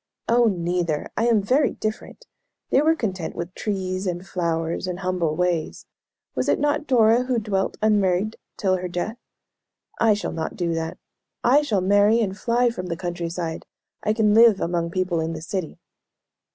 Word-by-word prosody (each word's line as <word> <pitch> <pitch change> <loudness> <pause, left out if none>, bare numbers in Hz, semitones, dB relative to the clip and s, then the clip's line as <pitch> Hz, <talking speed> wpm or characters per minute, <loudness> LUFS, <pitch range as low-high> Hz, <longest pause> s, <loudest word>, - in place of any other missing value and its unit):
'" - - -54
"Oh, 240 +1 +4
neither! 175 -5 -1
I 230 - +1
am 220 -4 +3
very 260 +8 +2
different! 215 - -5 0.5
They 270 - +5
were 320 +2 +3
content 185 - -3
with 170 +1 -5
trees 190 -2 -3
and 175 +1 -3
flowers, 170 -1 -2
and 180 +1 -4
humble 180 -4 0
ways. 175 -2 -1 0.5
Was - - -1
it - - +3
not 295 +1 0
Dora 235 -1 +4
who 250 -1 0
'dwelt 205 -3 -1
unmarried 205 -1 +2 0.2
till 190 -3 +1
her 180 0 -4
death?' 180 +7 -4 0.8
I 225 -2 +4
shall 205 - -4
not 160 -1 -4
do 170 -2 -1
that. 165 0 -3 0.5
I 270 +5 +5
shall 220 -10 0
marry 205 +4 +4
and 195 -4 -1
fly 240 +3 +1
from 185 -6 -6
the 170 -2 -3
country 175 -1 -4
side. 165 -1 -5 0.3
I 215 - +1
can 215 -2 +3
live 225 -2 +6
among 170 -1 -1
people 185 -1 -1
in 160 +1 -2
the 160 - -6
city." 185 -2 -4
190 Hz, 180 wpm, -23 LUFS, 175-225 Hz, 0.8 s, live